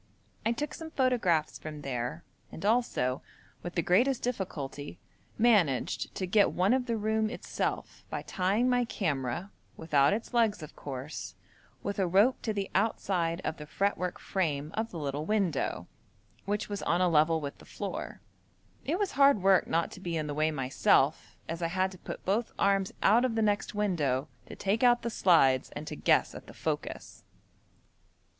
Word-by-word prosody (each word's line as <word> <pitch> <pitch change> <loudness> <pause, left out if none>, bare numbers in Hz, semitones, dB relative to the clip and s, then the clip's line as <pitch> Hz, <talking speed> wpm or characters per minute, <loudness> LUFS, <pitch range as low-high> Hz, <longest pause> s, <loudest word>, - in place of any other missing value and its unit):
I 225 - +2
took 290 +5 -3
some 325 -1 -7
photographs 235 - +1
from 155 -1 -7
there, 125 +4 -3 0.3
and 165 - -7
also, 205 - +1 0.4
with 175 - -7
the 170 - +1
greatest 240 - +3
difficulty, 160 - -4 0.4
managed 200 - +2
to 190 - -2
get 200 +3 +4
one 185 +6 +2
of 255 -1 0
the 230 -1 0
room 220 0 0
itself - - -4
by - - -4
tying 195 +7 +1
my 245 -1 +3
camera, 165 - -2 0.3
without 145 -3 +3
its 220 +4 -3
legs, 225 -7 +2
of 150 - -10
course, 140 +1 -6 0.5
with 200 0 -3
a 190 - +2
rope 205 +9 +3
to 220 - -1
the 200 -2 -3
outside 185 -5 0
of 155 - -3
the 150 - -9
fretwork 185 0 -1
frame 155 -5 -2
of 225 +1 -2
the 175 - -8
little 145 0 -3
window, 195 -9 0 0.6
which 205 +1 -1
was 205 -1 -4
on 175 - +1
a 180 - +4
level 160 0 +3
with 145 -2 -6
the - - -14
floor. - - -6 0.6
It 320 +5 -1
was 405 -1 -1
hard 275 -8 +4
work 195 -1 +5
not 165 +1 0
to - - -10
be 175 -3 -3
in 155 - -2
the 145 - -3
way 155 +2 +2
myself, 135 -4 +1
as 165 +1 -4
I 165 - +1
had 185 +2 0
to 185 - -12
put - - -8
both 215 +5 0
arms 195 -1 +2
out 230 +4 +5
of 250 -3 0
the 225 - +2
next 205 0 0
window 155 -9 0 0.2
to - - -9
take 200 +3 0
out 240 -1 +4
the 235 - -2
slides, 135 -11 +4
and 150 - -5
to - - -5
guess - - +2
at - - -10
the - - -12
focus. - - -4
190 Hz, 180 wpm, -30 LUFS, 155-220 Hz, 0.6 s, work